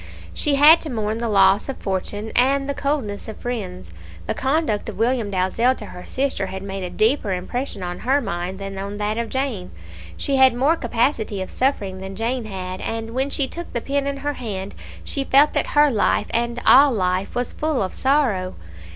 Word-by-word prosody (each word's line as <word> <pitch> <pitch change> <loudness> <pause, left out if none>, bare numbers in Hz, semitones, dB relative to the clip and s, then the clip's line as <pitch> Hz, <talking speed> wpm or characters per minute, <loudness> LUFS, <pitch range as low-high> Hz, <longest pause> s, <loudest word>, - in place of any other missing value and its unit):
She 295 -2 +1
had 300 +4 +8
to 315 - -3
mourn 220 -2 -2
the 235 -1 -2
loss 195 +2 +4
of 270 - -4
fortune 205 +3 -3
and 275 +3 +3
the 280 - -1
coldness 275 -9 -2
of 220 - -7
friends; 190 - -5 0.3
the - - -1
conduct 265 -7 0
of 220 - -8
William 230 -1 +1
Dalzell 200 +7 +1
to 215 - -8
her 180 - -10
sister 265 -7 -1
had 190 0 -6
made 195 -1 -5
a 180 - -3
deeper 220 0 +1
impression 200 +3 -4
on 175 0 -5
her 270 +3 +2
mind 185 -5 -4
than 195 0 -6
on 200 +1 -5
that 210 +2 -1
of 230 -1 -3
Jane. 260 -9 -2 0.5
She 275 -1 0
had 260 -2 +6
more 280 +7 +3
capacity 230 -7 -1
of 185 - -5
suffering 205 -8 -1
than 190 0 -7
Jane 235 +3 -2
had, 185 -2 -5
and 225 0 -4
when 265 +3 -1
she 280 -1 -1
took 345 +4 -7
the 235 - 0
pen 280 +3 -1
in 280 0 -2
her 290 +1 -2
hand, 200 -6 -5 0.3
she 275 - -2
felt 280 +2 +4
that - - 0
her 295 -1 +6
life 210 -2 +2
and 235 +1 -1
all 275 +2 +7
life 185 -3 -1
was 245 0 -2
full 305 -7 0
of 185 - -4
sorrow. 255 -10 +1
230 Hz, 205 wpm, -22 LUFS, 195-270 Hz, 0.5 s, had